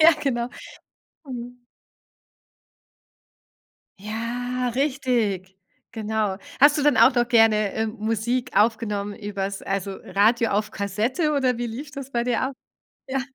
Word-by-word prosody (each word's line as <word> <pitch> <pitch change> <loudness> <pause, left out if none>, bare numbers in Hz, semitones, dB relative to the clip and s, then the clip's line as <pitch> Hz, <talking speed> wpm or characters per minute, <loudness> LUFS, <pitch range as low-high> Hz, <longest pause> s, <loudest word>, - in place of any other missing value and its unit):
Ja, 325 +2 +9
genau. 240 -4 0 0.8
Mhm. 245 -1 -8 2.3
Ja, 240 +4 -3
richtig, 240 - 0 0.4
genau. 215 -3 -1 0.2
Hast 290 +2 +7
du - - +1
denn 295 -1 +4
auch - - +6
noch 240 -1 +2
gerne, 220 -3 +4
ähm, 220 0 -1
Musik 225 +3 -1
aufgenommen 210 -2 +1
übers 200 -2 -4
also, 195 0 -3
Radio 220 +4 +2
auf 210 +1 0
Kassette, 220 - -1
oder 260 -4 +1
wie 240 - -2
lief 260 +6 -6
das 275 -2 -8
bei 235 -1 0
dir 245 -1 +1
ab? 260 +2 -1 0.6
Ja. 265 0 0
230 Hz, 125 wpm, -24 LUFS, 210-255 Hz, 2.3 s, Ja